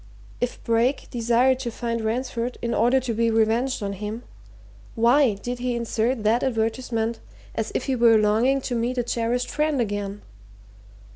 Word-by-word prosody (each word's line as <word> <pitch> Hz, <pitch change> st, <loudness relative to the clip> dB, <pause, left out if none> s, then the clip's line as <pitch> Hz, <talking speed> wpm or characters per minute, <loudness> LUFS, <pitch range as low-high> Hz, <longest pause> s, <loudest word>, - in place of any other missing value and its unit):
If 245 Hz, -, -3 dB
Brake 230 Hz, +4 st, +1 dB
desired 245 Hz, +2 st, +2 dB
to 255 Hz, -2 st, -3 dB
find 230 Hz, 0 st, -3 dB
Ransford 235 Hz, +2 st, -2 dB
in 235 Hz, 0 st, -1 dB
order 245 Hz, +4 st, +3 dB
to 250 Hz, -2 st, -3 dB
be 230 Hz, +1 st, +1 dB
revenged 225 Hz, +2 st, +1 dB
on 200 Hz, 0 st, -2 dB
him, 210 Hz, +4 st, -5 dB, 0.7 s
why 240 Hz, 0 st, +4 dB
did 245 Hz, +5 st, -5 dB
he 245 Hz, 0 st, -1 dB
insert 235 Hz, 0 st, -1 dB
that 225 Hz, +3 st, +3 dB
advertisement, 230 Hz, -1 st, -1 dB, 0.3 s
as -, -, -3 dB
if -, -, -1 dB
he 270 Hz, -, 0 dB
were 230 Hz, -2 st, +5 dB
longing 225 Hz, +6 st, +2 dB
to 255 Hz, -, -4 dB
meet 240 Hz, +2 st, -1 dB
a 245 Hz, -, +1 dB
cherished 240 Hz, +1 st, -1 dB
friend 300 Hz, -2 st, 0 dB
again? 205 Hz, -2 st, -3 dB
235 Hz, 160 wpm, -24 LUFS, 225-250 Hz, 0.7 s, were